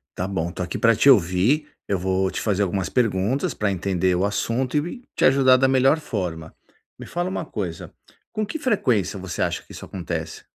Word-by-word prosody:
Tá 90 Hz, -, -2 dB
bom, 85 Hz, -3 st, -2 dB
estou 90 Hz, -, -5 dB
aqui 90 Hz, -, -4 dB
pra 115 Hz, -1 st, +4 dB
te 140 Hz, -, +4 dB
ouvir. 110 Hz, -, +4 dB, 0.2 s
Eu 100 Hz, -, 0 dB
vou 95 Hz, +1 st, 0 dB
te -, -, -4 dB
fazer 100 Hz, -2 st, +1 dB
algumas 95 Hz, -2 st, -1 dB
perguntas 115 Hz, +2 st, 0 dB
pra 105 Hz, -2 st, -1 dB
entender 95 Hz, 0 st, 0 dB
o 90 Hz, +2 st, +1 dB
assunto 115 Hz, +6 st, -1 dB
e 245 Hz, +6 st, -8 dB
te -, -, +2 dB
ajudar 130 Hz, -1 st, +6 dB
da 135 Hz, +1 st, +3 dB
melhor 135 Hz, +4 st, +3 dB
forma. 85 Hz, -, -4 dB, 0.5 s
Me -, -, -8 dB
fala 175 Hz, +1 st, -2 dB
uma 180 Hz, -3 st, -3 dB
coisa, 90 Hz, -, -5 dB, 0.4 s
com 215 Hz, 0 st, -2 dB
que 320 Hz, +9 st, -5 dB
frequência 125 Hz, -, +1 dB
você 95 Hz, -1 st, -5 dB
acha -, -, -1 dB
que -, -, -18 dB
isso -, -, -9 dB
acontece? 85 Hz, -3 st, -5 dB
100 Hz, 200 wpm, -23 LUFS, 90-130 Hz, 0.5 s, ajudar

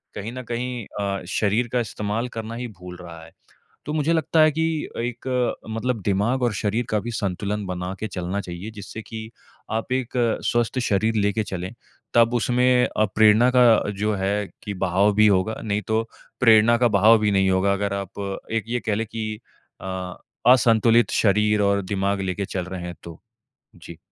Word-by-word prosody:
कहीं 105 Hz, +3 st, -5 dB
न 130 Hz, 0 st, -6 dB
कहीं 120 Hz, -1 st, -3 dB, 0.2 s
अ, 100 Hz, -1 st, -2 dB
शरीर 110 Hz, +3 st, +1 dB
का 125 Hz, -, +2 dB
इस्तेमाल 110 Hz, 0 st, -3 dB
करना 115 Hz, +1 st, -5 dB
ही 120 Hz, +1 st, -4 dB
भूल 90 Hz, 0 st, -9 dB
रहा 85 Hz, -2 st, -10 dB
है, 80 Hz, -, -15 dB, 0.5 s
तो 150 Hz, -, -4 dB
मुझे 155 Hz, +1 st, +1 dB
लगता 160 Hz, 0 st, +1 dB
है 155 Hz, 0 st, +6 dB
कि 160 Hz, +2 st, -1 dB, 0.4 s
एक 120 Hz, +1 st, -4 dB, 0.4 s
मतलब 115 Hz, +1 st, -2 dB
दिमाग़ 105 Hz, +6 st, +1 dB
और 120 Hz, -, +1 dB
शरीर 110 Hz, +3 st, -1 dB
का 105 Hz, -, +1 dB
भी 120 Hz, -, -5 dB
संतुलन 100 Hz, -1 st, -3 dB
बना 90 Hz, 0 st, -4 dB
के 110 Hz, -, -3 dB
चलना 95 Hz, 0 st, -3 dB
चाहिए, 90 Hz, +4 st, -7 dB
जिससे 110 Hz, +1 st, -8 dB
कि 110 Hz, 0 st, -8 dB, 0.4 s
आप 110 Hz, +3 st, -3 dB
एक 130 Hz, -2 st, -2 dB, 0.3 s
स्वस्थ 120 Hz, +2 st, 0 dB
शरीर 110 Hz, -1 st, +1 dB
लेके 105 Hz, 0 st, +1 dB
चलें, 95 Hz, +1 st, -5 dB, 0.4 s
तब 115 Hz, 0 st, +4 dB
उसमें 125 Hz, +1 st, +3 dB
अ, 110 Hz, -, 0 dB
प्रेरणा 110 Hz, +3 st, +5 dB
का 125 Hz, -, +7 dB, 0.3 s
जो 105 Hz, +1 st, +1 dB
है 100 Hz, +1 st, -1 dB, 0.2 s
कि 105 Hz, -, -4 dB
बहाव 100 Hz, +3 st, +2 dB
भी 110 Hz, +1 st, +6 dB
होगा, 100 Hz, +2 st, +2 dB
नहीं 105 Hz, -1 st, -1 dB
तो 110 Hz, 0 st, +1 dB, 0.4 s
प्रेरणा 115 Hz, 0 st, +6 dB
का 120 Hz, 0 st, +3 dB
बहाव 110 Hz, +4 st, +7 dB
भी 105 Hz, -1 st, +1 dB
नहीं 95 Hz, -1 st, +3 dB
होगा। 95 Hz, +1 st, +2 dB
अगर 100 Hz, 0 st, -2 dB
आप 100 Hz, +1 st, -6 dB
एक 115 Hz, -1 st, 0 dB
ये 120 Hz, +1 st, -1 dB
कह 105 Hz, -, +2 dB
ले 110 Hz, +2 st, -1 dB
कि 110 Hz, -1 st, -5 dB, 0.4 s
अ, 95 Hz, -, -7 dB, 0.6 s
असंतुलित 115 Hz, -1 st, +4 dB
शरीर 105 Hz, 0 st, +2 dB
और 100 Hz, 0 st, +2 dB
दिमाग़ 100 Hz, +1 st, -1 dB
लेके 95 Hz, +1 st, -2 dB
चल 95 Hz, -2 st, -4 dB
रहे 90 Hz, -1 st, -6 dB
हैं, 90 Hz, 0 st, -6 dB
तो। 85 Hz, -2 st, -11 dB, 0.5 s
जी। 85 Hz, -1 st, -12 dB
105 Hz, 185 wpm, -23 LUFS, 100-115 Hz, 0.6 s, का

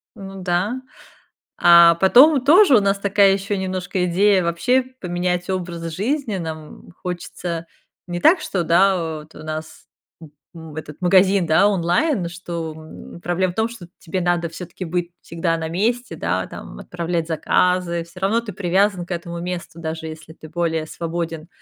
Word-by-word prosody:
Ну 195 Hz, -2 st, -9 dB
да. 185 Hz, +8 st, -1 dB, 0.8 s
А 170 Hz, -1 st, +7 dB
потом 255 Hz, -, +6 dB
тоже 315 Hz, +1 st, +6 dB
у -, -, +3 dB
нас 200 Hz, 0 st, +1 dB
такая 200 Hz, 0 st, +4 dB
еще 200 Hz, +1 st, -2 dB
немножко 185 Hz, -1 st, -2 dB
идея 190 Hz, +2 st, +3 dB
вообще 245 Hz, +10 st, +1 dB, 0.2 s
поменять 180 Hz, 0 st, -2 dB
образ 170 Hz, -3 st, -4 dB
жизни. 225 Hz, -, -1 dB
Нам 160 Hz, -3 st, -8 dB
хочется 175 Hz, -1 st, -5 dB, 0.4 s
не 175 Hz, 0 st, -4 dB
так, 330 Hz, -, +5 dB
что, 185 Hz, -, -2 dB
да, 170 Hz, -2 st, +2 dB
вот 150 Hz, +1 st, -15 dB
у -, -, -10 dB
нас, 155 Hz, 0 st, -7 dB, 0.4 s
м, 160 Hz, -3 st, -12 dB, 0.2 s
м, 160 Hz, -2 st, -10 dB
этот 150 Hz, -1 st, -8 dB
магазин 190 Hz, +1 st, +4 dB
да, 160 Hz, +5 st, +4 dB
онлайн, 190 Hz, -, +1 dB
что, 170 Hz, -2 st, -6 dB
м, 160 Hz, +2 st, -12 dB
проблема 175 Hz, +1 st, -1 dB
в -, -, -25 dB
том, 220 Hz, +1 st, 0 dB
что 225 Hz, -7 st, -11 dB
тебе 185 Hz, +2 st, -3 dB
надо 175 Hz, -1 st, 0 dB
все-таки 175 Hz, +2 st, -8 dB
быть 175 Hz, +1 st, -2 dB
всегда 165 Hz, 0 st, -2 dB
на 160 Hz, -1 st, -4 dB
месте, 230 Hz, +8 st, -1 dB
да? -, -, -2 dB
Там -, -, -10 dB
отправлять 170 Hz, -1 st, -3 dB
заказы. 170 Hz, +1 st, +1 dB
Всё 170 Hz, +2 st, -14 dB
равно 200 Hz, +5 st, +1 dB
ты 220 Hz, -4 st, -8 dB
привязан 190 Hz, 0 st, +1 dB
к 180 Hz, -, -12 dB
этому 170 Hz, 0 st, -5 dB
месту 175 Hz, -1 st, -6 dB
даже, 160 Hz, 0 st, -5 dB
если 160 Hz, 0 st, -10 dB
ты 160 Hz, -1 st, -13 dB
более 160 Hz, -1 st, -1 dB
свободен, 165 Hz, -1 st, -5 dB
175 Hz, 165 wpm, -21 LUFS, 165-195 Hz, 0.8 s, А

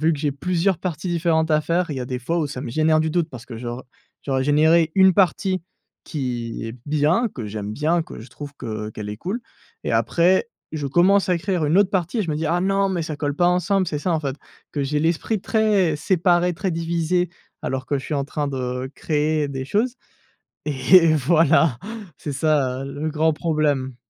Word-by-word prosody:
vu 160 Hz, +1 st, +3 dB
que 145 Hz, -, -3 dB
j'ai 145 Hz, 0 st, 0 dB
plusieurs 180 Hz, +5 st, 0 dB
parties 175 Hz, -1 st, -4 dB
différentes 165 Hz, -2 st, +1 dB
à 155 Hz, 0 st, +4 dB
faire, 170 Hz, +1 st, 0 dB
il 140 Hz, -, -3 dB
y -, -, -3 dB
a 125 Hz, -, -3 dB
des 125 Hz, -1 st, -3 dB
fois 165 Hz, +8 st, -1 dB
où 155 Hz, -, 0 dB
ça 130 Hz, -2 st, -6 dB
me 120 Hz, -, -5 dB
génère 155 Hz, +3 st, +3 dB
du 160 Hz, 0 st, 0 dB
doute 170 Hz, 0 st, 0 dB
parce 125 Hz, -4 st, -10 dB
que 120 Hz, -2 st, -8 dB
j'aur 120 Hz, +1 st, -6 dB, 0.4 s
j'aurais 135 Hz, -1 st, 0 dB
généré 160 Hz, +3 st, +4 dB
1 190 Hz, -1 st, +6 dB
partie 185 Hz, -1 st, +2 dB, 0.4 s
qui 120 Hz, -7 st, -4 dB
est 115 Hz, +2 st, -7 dB
bien, 155 Hz, +10 st, +2 dB
que 115 Hz, -5 st, -5 dB
j'aime 105 Hz, 0 st, -5 dB
bien, 160 Hz, +7 st, +1 dB
que 170 Hz, -, -10 dB
je 120 Hz, -, -11 dB
trouve 145 Hz, +1 st, -8 dB
que, 125 Hz, -, -8 dB, 0.2 s
heu, -, -, -8 dB
qu'elle 105 Hz, -1 st, -6 dB
est 105 Hz, -, -5 dB
cool 190 Hz, -, -4 dB, 0.4 s
et -, -, -1 dB
après, 185 Hz, +6 st, +3 dB, 0.2 s
je 150 Hz, -3 st, -3 dB
commence 185 Hz, +7 st, +3 dB
à 180 Hz, -, +3 dB
écrire 175 Hz, -1 st, -1 dB
1 150 Hz, +5 st, +2 dB
autre 200 Hz, -1 st, +4 dB
partie 185 Hz, +4 st, -1 dB
et -, -, +2 dB
je 170 Hz, -, -3 dB
me 150 Hz, -, -1 dB
dis: 155 Hz, +1 st, -2 dB
«Ah 175 Hz, +3 st, +1 dB
non, 195 Hz, +1 st, +2 dB
mais 175 Hz, -3 st, -1 dB
ça 155 Hz, -2 st, -4 dB
colle 145 Hz, -1 st, -2 dB
pas 175 Hz, +3 st, +2 dB
ensemble». 185 Hz, +2 st, +1 dB
C'est 150 Hz, -, -2 dB
ça, 175 Hz, +3 st, -1 dB
en 160 Hz, -, +1 dB
fait, 140 Hz, -2 st, -3 dB, 0.3 s
que 145 Hz, -, -2 dB
j'ai 150 Hz, +2 st, 0 dB
l'esprit 170 Hz, +6 st, 0 dB
très 205 Hz, -7 st, +2 dB
séparé, 175 Hz, +1 st, +2 dB
très 190 Hz, +2 st, -2 dB
divisé 170 Hz, +1 st, 0 dB, 0.3 s
alors 130 Hz, 0 st, -2 dB
que 145 Hz, -, 0 dB
je -, -, -8 dB
suis 155 Hz, -, -3 dB
en 140 Hz, -1 st, 0 dB
train 145 Hz, +1 st, -3 dB
de 130 Hz, -1 st, -3 dB
créer 150 Hz, -1 st, 0 dB
des 135 Hz, -1 st, -4 dB
choses 235 Hz, -, 0 dB, 0.7 s
et 155 Hz, +4 st, +5 dB
voilà, 155 Hz, -2 st, +3 dB, 0.4 s
c'est 145 Hz, -, -5 dB
ça, 135 Hz, -3 st, +1 dB
heu, 135 Hz, 0 st, -6 dB
le 155 Hz, -, 0 dB
grand 160 Hz, +1 st, +2 dB
problème. 150 Hz, -5 st, 0 dB
155 Hz, 220 wpm, -22 LUFS, 140-175 Hz, 0.7 s, 1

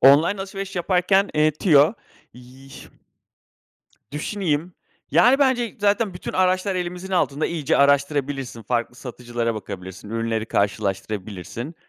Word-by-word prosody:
Online 150 Hz, +9 st, +6 dB
alışveriş 195 Hz, 0 st, -6 dB
yaparken, 185 Hz, +3 st, +2 dB
eee, 155 Hz, 0 st, +4 dB
tüyo, 155 Hz, 0 st, +4 dB, 0.4 s
yıh 130 Hz, +2 st, -14 dB, 1.2 s
düşüneyim. 165 Hz, 0 st, -2 dB, 0.4 s
Yani, 260 Hz, +3 st, +5 dB
bence 260 Hz, -5 st, +1 dB
zaten 205 Hz, -1 st, +1 dB
bütün 180 Hz, -, -6 dB
araçlar 185 Hz, +1 st, +1 dB
elimizin 180 Hz, +1 st, -4 dB
altında, 150 Hz, -4 st, +1 dB
iyice 160 Hz, -5 st, 0 dB
araştırabilirsin. 140 Hz, -3 st, +1 dB
Farklı 120 Hz, +2 st, -1 dB
satıcılara 120 Hz, -2 st, -4 dB
bakabilirsin, 95 Hz, -1 st, -8 dB
ürünleri 115 Hz, -1 st, -2 dB
karşılaştırabilirsin. 100 Hz, -, -3 dB
145 Hz, 105 wpm, -23 LUFS, 120-185 Hz, 1.2 s, Online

